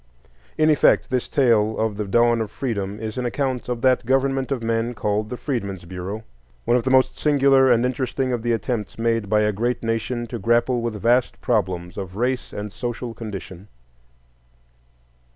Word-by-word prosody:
In 155 0 +4
effect, 150 - +3
this 125 -1 -1
tale 110 -5 +3
of 110 -1 0
the 105 0 -3
dawn 120 +2 +3
of 110 - -3
Freedom 105 -4 -3
is 110 +2 -4
an 125 - -2
account 130 -1 -2
of 120 -1 -2
that 130 0 +3
government 135 +1 +1
of 125 -4 -1
men 115 +1 -1
called 105 0 -1
the 125 - -5
Freedmen's 100 - -4
Bureau,—one 85 - -5
of 125 - +3
the 130 - 0
most 130 0 +3
singular 135 -3 +4
and 120 0 +3
interesting 130 0 -1
of 120 - -1
the 120 +1 0
attempts 110 -2 -2
made 115 -3 0
by 105 0 +3
a 105 0 +2
great 120 +5 -1
nation 115 +1 -2
to 120 0 -6
grapple 120 +3 +2
with 115 -3 -3
vast 120 +4 +2
problems 90 -6 -1
of 95 -2 -6
race 125 +3 -1
and 105 0 -6
social 120 0 -4
condition. 100 -4 -8
115 Hz, 175 wpm, -22 LUFS, 105-125 Hz, -, In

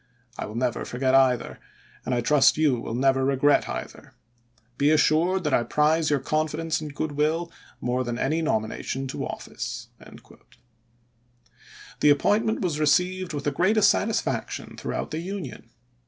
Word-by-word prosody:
I - - -5
will 105 - -9
never 120 0 -1
forget 130 +1 -1
either, 130 -2 +2 0.5
and 120 -2 0
trust 145 +2 +4
you 145 -6 +2
will 115 - -5
never 135 +1 +2
regret 140 +2 +2
either. - - -7 0.6
Be 145 +3 +2
assured 160 +4 +3
that 150 -3 -1
I - - +4
prize 155 +5 +1
your 145 - +3
confidence 155 +3 -1
and 150 -2 -7
good 155 0 -2
will 155 +4 0 0.3
more 125 +1 -1
than 120 -1 -4
any 155 +6 0
nomination 130 -1 -2
to - - -4
office." - - -6 2.1
The 150 - +4
appointment 215 +10 +2
was 165 -6 -1
received 180 +3 +1
with 145 -1 -4
the 145 - 0
greatest 205 +7 +4
satisfaction 220 +1 -2
throughout - - -4
the 155 - -3
Union. 185 -8 -7
150 Hz, 145 wpm, -25 LUFS, 130-165 Hz, 2.1 s, trust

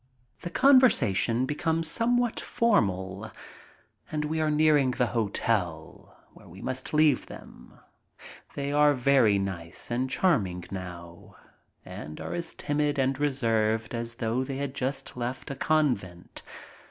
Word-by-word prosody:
The 175 - -6
conversation 135 - +4
becomes 160 +3 -1
somewhat 240 +4 +1
formal. 100 - 0 0.8
And 150 -1 -1
we 160 +1 -1
are 155 - +1
nearing 150 -3 +3
the 125 0 +1
hotel, 100 -7 -2 0.2
where - - -17
we 90 +3 -12
must 130 +3 -4
leave 150 -3 +3
them. - - -13 0.8
They 140 0 -3
are 145 0 +4
very 125 -5 +4
nice 95 -1 -5
and 125 +2 -1
charming 105 - +1
now 85 -3 -9 0.5
and 75 +1 -8
are - - -5
as 170 -1 -3
timid 145 0 -1
and 135 0 0
reserved 115 -6 0
as 115 0 -3
though 115 +3 -1
they 135 0 -5
had 140 -1 -3
just 135 0 -3
left 125 +3 -4
a - - -4
convent. 125 - -1
130 Hz, 130 wpm, -27 LUFS, 105-150 Hz, 0.8 s, conversation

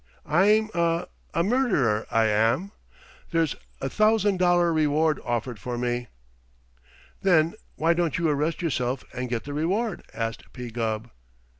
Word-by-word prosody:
I'm 210 +7 +3
a 170 0 +1 0.2
a 170 - +1
murderer, 185 - +1
I 115 0 +3
am. 115 - +2 0.6
There's 165 -4 +1 0.2
a 135 - -2
thousand 215 +2 +3
dollar 175 -1 +3
reward 155 0 +2
offered 120 -1 -2
for 120 +6 -4
me." 120 0 -2 1.1
"Then 170 -4 +4 0.2
why 165 +2 +3
don't 170 -2 0
you 165 0 +1
arrest 155 +4 0
yourself 130 -4 -1
and 125 0 -4
get 120 -2 -2
the 145 - -6
reward?" 185 +8 -1
asked 115 0 -5
P. 125 -2 -7
Gubb. 110 0 -3
155 Hz, 140 wpm, -26 LUFS, 120-175 Hz, 1.1 s, Then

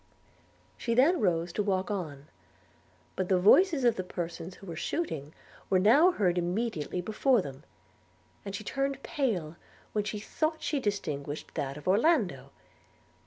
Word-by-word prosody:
She 230 - -1
then 295 +9 +5
arose 170 - 0
to - - 0
walk 190 -1 0
on; 150 -8 -4 0.9
but 185 -1 -2
the 190 - +4
voices 285 - +5
of 240 -2 +3
the 185 - -2
persons 175 0 -6
who - - -14
were 170 -3 -6
shooting 160 - -3 0.4
were 190 - +4
now 240 - +6
heard 180 - +1
immediately 180 -2 -2
before 220 +6 +2
them, 135 +1 -9 0.8
and 200 -1 -5
she 215 - -6
turned 275 +3 -2
pale 180 - -2 0.3
when 210 - 0
she 210 +1 -4
thought 310 +9 -2
she 295 - 0
distinguished 155 - -3
that 140 -2 -3
of 150 - -10
Orlando. 195 - +2
195 Hz, 150 wpm, -29 LUFS, 170-245 Hz, 0.9 s, now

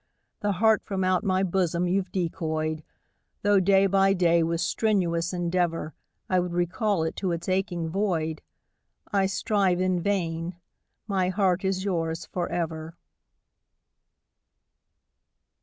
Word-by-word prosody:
The 205 -1 0
heart 220 +3 +3
from 190 -2 -2
out 185 +1 +2
my 190 -2 +1
bosom 180 -2 0
you've 185 0 0
decoyed, 160 -3 -2 0.6
Though 205 -1 +5
day 195 +1 +4
by 195 0 +4
day 170 -2 +3
with 165 0 0
strenuous 175 -6 0
endeavour 175 -3 -1 0.3
I 185 - +2
would 180 -1 -2
recall 175 +2 0
it 160 - -2
to 185 -3 -1
its 170 0 -4
aching 185 -3 -1
void. 160 -4 -1 0.7
I 195 -1 +3
strive 195 -2 +1
in 185 -1 +1
vain 170 -3 -1 0.5
my 190 -4 0
heart 185 -1 +1
is 190 -1 0
yours 165 -4 -1
for 175 -1 -3
ever. 160 -1 -3
180 Hz, 125 wpm, -26 LUFS, 170-195 Hz, 0.7 s, Though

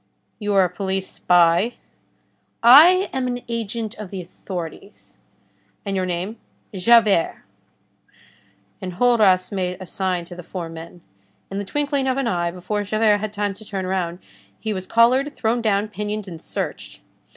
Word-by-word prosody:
"You 205 -2 -1
are 195 - +6
a - - +2
police 190 0 -3
spy?" 175 +6 +3 0.9
"I 330 +11 +8
am 260 -1 -1
an 245 0 -3
agent 230 -1 -3
of 210 -3 -7
the 195 - -6
authorities." 175 -1 -9 0.7
"And 200 -1 -2
your 185 -1 0
name?" 180 +5 -3 0.4
"Javert." 205 -2 +3 1.4
Enjolras 185 -1 +3
made 180 -2 -2
a 185 - -7
sign 185 -1 -2
to 175 - -10
the 180 - -8
four 175 -1 -6
men. 165 +1 -10 0.5
In 195 - -3
the 200 - -4
twinkling 285 +2 -1
of 260 0 0
an 275 - 0
eye, 175 -5 0
before 185 +4 -3
Javert 215 +1 +2
had 215 0 -4
time 205 -1 -2
to 205 +3 -14
turn 195 -3 -4
round, 180 -2 -2 0.4
he 220 -1 -2
was 185 -1 -5
collared, 255 +5 +3
thrown 235 +1 0
down, 210 -1 +1
pinioned 210 0 -4
and 165 -3 -9
searched. - - -5
200 Hz, 155 wpm, -22 LUFS, 180-230 Hz, 1.4 s, I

